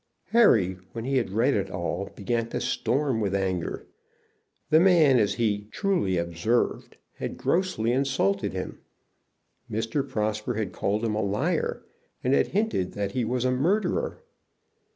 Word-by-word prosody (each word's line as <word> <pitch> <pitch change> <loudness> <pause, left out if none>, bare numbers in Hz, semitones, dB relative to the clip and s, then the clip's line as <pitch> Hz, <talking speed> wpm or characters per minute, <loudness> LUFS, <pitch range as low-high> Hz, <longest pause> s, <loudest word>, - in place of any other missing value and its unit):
Harry, 105 - +4
when 115 -1 -5
he 135 0 +1
had 120 - 0
read 115 +8 +2
it 100 - -1
all, 90 +2 -3
began 115 +3 -1
to - - -3
storm 125 0 0
with 100 -2 0
anger. 95 -3 -2 0.9
The 155 - +7
man, 165 -8 +5
as 105 -2 +1
he 105 -3 0
truly 180 - 0
observed, 85 +8 -1 0.2
had - - -5
grossly 170 -11 0
insulted 130 -7 +1
him. - - -5 0.9
Mr. 115 +6 -1
Prosper 110 +2 -1
had 105 -3 -3
called 105 +3 -1
him 110 - 0
a 105 - 0
liar 100 0 -1 0.4
and 130 - +2
had - - +3
hinted 200 - -1
that 100 -1 -2
he 125 +3 -1
was 125 +2 -1
a 130 - +3
murderer. 185 - 0
115 Hz, 150 wpm, -26 LUFS, 100-135 Hz, 0.9 s, The